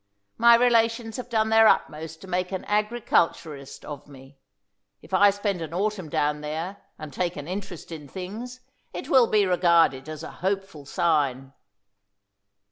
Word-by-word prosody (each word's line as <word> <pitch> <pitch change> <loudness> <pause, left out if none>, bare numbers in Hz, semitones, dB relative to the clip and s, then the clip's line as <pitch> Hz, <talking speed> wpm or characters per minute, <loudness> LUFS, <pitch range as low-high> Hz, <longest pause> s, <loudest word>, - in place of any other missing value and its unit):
My 235 +1 +8
relations 230 -1 +2
have 250 -1 -7
done 220 -2 +1
their 225 0 +6
utmost 160 -2 0
to 190 - -11
make 180 0 -2
an 190 - -4
agriculturist 205 - -1
of 145 -1 -8
me. 135 -1 -15 0.6
If 185 - -15
I 200 +2 +6
spend 200 -2 -2
an 160 +1 -6
autumn 195 -3 -2
down 150 0 0
there, 160 +6 -4 0.2
and 155 -2 -9
take 175 +3 -2
an 145 0 -7
interest 185 -2 -7
in 150 -3 -8
things, 220 - -7 0.3
it 270 - -6
will 255 -7 +5
be 210 -2 +3
regarded 170 -6 +3
as 155 -1 -7
a - - -7
hopeful 195 -5 -3
sign." 135 -5 0
180 Hz, 155 wpm, -25 LUFS, 150-215 Hz, 0.6 s, My